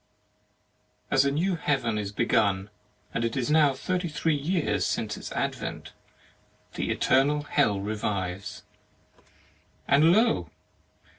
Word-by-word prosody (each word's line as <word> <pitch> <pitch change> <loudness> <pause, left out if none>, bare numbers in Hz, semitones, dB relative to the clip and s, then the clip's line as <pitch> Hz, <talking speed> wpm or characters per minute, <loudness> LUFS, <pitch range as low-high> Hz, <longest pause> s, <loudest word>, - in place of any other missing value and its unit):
As 135 0 +4
a 140 - +2
new 175 +6 0
heaven 135 -9 0
is 100 -1 -4
begun, 100 -1 +1 0.4
and 115 - -1
it 115 +3 -1
is 130 +3 -1
now 150 -3 +4
thirty 180 +5 -2
three 160 +1 0
years 160 +3 0
since - - -1
its - - -8
advent, - - -4 0.8
the - - -3
Eternal 145 +3 +2
Hell 135 -9 +1
revives. 100 -1 -3 1.2
And 150 +4 +5
lo! 225 +5 +2
140 Hz, 120 wpm, -27 LUFS, 105-155 Hz, 1.2 s, And